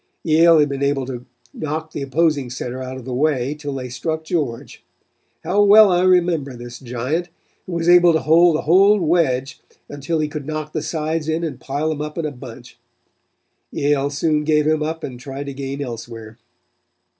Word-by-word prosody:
"Yale 165 +1 +5
had 150 -1 +4
been 140 -1 -5
able 140 -1 0
to 125 -1 -7 0.3
knock 155 +1 -4
the 145 - -5
opposing 145 -1 0
center 125 +1 -5
out 130 0 -6
of 130 - -10
the 130 - -5
way 140 -1 0
till 145 -2 -6
they 130 -1 -5
struck 155 +6 -4
George. 150 -8 -4 0.6
How 185 +5 +1
well 205 0 +7
I 175 0 +2
remember 175 -7 +2
this 120 0 -9
giant, 130 +8 -3 0.4
who 185 - -6
was 170 0 -2
able 175 0 +7
to 160 - +1
hold 165 +1 +4
the - - -1
whole 195 +6 +5
wedge 155 -6 0 0.3
until 145 +3 -3
he 155 -1 0
could 150 -2 -7
knock 155 0 -5
the 155 - -2
sides 160 0 -3
in 160 +2 -1
and 145 -6 -4
pile 145 +4 -2
them 150 -2 -3
up 150 +1 -6
in 165 - -2
a 150 - -2
bunch. 125 -3 -12 0.9
Yale 140 -1 0
soon 150 +1 0
gave 150 -1 +2
him 155 0 +1
up 160 +1 -3
and 125 -2 -6
tried 135 +2 -7
to 140 - -6
gain 140 +1 -5
elsewhere. 115 -2 -9
150 Hz, 190 wpm, -20 LUFS, 135-160 Hz, 0.9 s, well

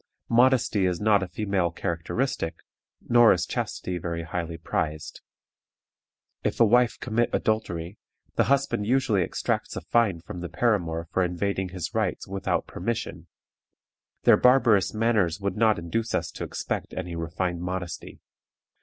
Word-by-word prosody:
Modesty 120 -5 +4
is 90 -2 -1
not 105 -1 +4
a 95 - -2
female 95 -1 -1
characteristic, 85 +2 -2 0.5
nor 120 -1 +7
is 90 - +1
chastity 90 -1 -3
very 85 0 -4
highly 85 0 -4
prized. 75 -1 -3 1.2
If - - -1
a 115 - +7
wife 120 +2 +3
commit 120 0 0
adultery, 90 -4 -2 0.4
the - - +3
husband 140 -6 +1
usually 120 -6 +2
exacts 85 - -2
a - - -4
fine 110 -8 +2
from 90 - -8
the 90 - -5
paramour 85 -8 0
for 95 - +2
invading 95 +2 -1
his 90 -2 -5
rights - - -1
"without 95 0 -1
permission." 90 -4 -4 1.0
Their - - +7
barbarous 125 -6 +4
manners 110 -6 +1
would 100 0 -2
not 110 -1 +3
induce 110 +7 -2
us - - -2
to - - -5
expect - - -4
any 90 -2 -4
refined 85 +1 -3
modesty. 90 -1 -5
95 Hz, 140 wpm, -26 LUFS, 85-115 Hz, 1.2 s, nor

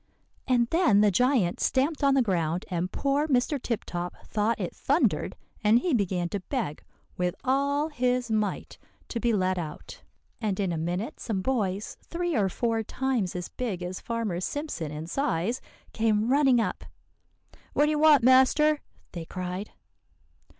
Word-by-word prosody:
"And 245 -2 +3
then 325 - +4
the 210 -1 +5
giant 240 -3 +2
stamped 285 +3 +1
on 275 -1 +4
the 265 - +4
ground, 175 -4 -1
and 180 +1 -1
poor 280 +2 0
Mr. 270 0 +1
Tip 230 -3 -2
Top 175 0 -4
thought 220 +2 0
it - - -4
thundered, - - +1 0.3
and 215 +2 +5
he 330 +6 0
began 185 -6 0
to 200 - -2
beg 205 - -4 0.3
with 180 -1 0
all 280 +3 +1
his 250 -4 0
might 215 -3 -2 0.3
to 235 - -3
be 235 0 +1
let 185 -3 +1
out. 160 -3 -7 0.4
And 210 -3 -1
in 195 -3 0
a - - -1
minute 175 +7 -3
some 195 -5 -3
boys, 205 -5 -1
three 345 -1 -3
or 200 -5 +2
four 230 +3 0
times 235 -5 -1
as 180 -1 -4
big 205 -8 -4
as 180 +1 -4
Farmer 230 -7 -2
Simpson 185 - -4
in 155 +1 -5
size, 225 - -1 0.3
came 220 0 +1
running 270 -2 +4
up. 225 - -2 0.9
'What 295 - +4
do 300 - +1
you 300 - 0
want, 300 -4 +6
master?' 265 +4 +5 0.3
they 170 -2 -6
cried. 185 +3 -5
225 Hz, 165 wpm, -27 LUFS, 185-265 Hz, 0.9 s, want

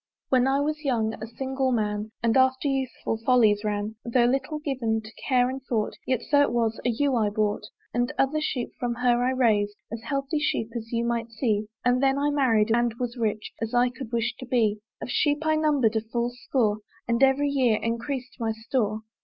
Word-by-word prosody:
When 255 -1 +4
I 275 +1 +2
was 305 +1 -2
young, 225 -5 0
a 220 - -4
single 265 +2 -2
man, 210 -2 -1
And 230 -1 +2
after 260 +1 +3
youthful 265 -4 -2
follies 225 -4 +4
ran, 210 +1 -2
Though 240 0 +2
little 270 +4 0
given 255 -7 -1
to 215 - -11 0.2
care 250 -2 +4
and 265 +1 -4
thought, 225 -5 -1
Yet, 255 -3 0
so 285 0 +3
it 285 - +3
was, 230 -2 0
a 245 - +1
ewe 265 +3 +1
I 215 -3 +2
bought; 210 0 -1 0.3
And 245 +1 0
other 290 +3 +1
sheep 255 -5 -2
from 240 -1 -1
her 245 0 +2
I 250 - +2
raised, 215 -6 +2 0.2
As 225 0 -5
healthy 275 +4 -2
sheep 235 -6 -1
as 230 -1 -5
you 235 0 0
might 235 -1 -1
see, 220 -2 -1 0.2
And 250 +1 +3
then 270 0 +3
I 290 +1 +1
married, 230 -6 +3
and 240 -1 +1
was 245 0 -3
rich 215 -3 -2
As 225 +2 -2
I 245 +1 +4
could 250 -2 -9
wish 235 +1 0
to 255 - -6
be; 220 -4 +2 0.2
Of - - -5
sheep 295 +1 +1
I 315 0 +3
number'd 290 -8 +2
a 220 - +2
full 235 +2 -2
score, 240 -4 0 0.3
And 235 +1 +1
every 270 +2 +4
year 255 -6 +2
encreas'd 245 +3 -3
my 225 -1 0
store. 220 -1 -2
245 Hz, 210 wpm, -26 LUFS, 225-265 Hz, 0.3 s, When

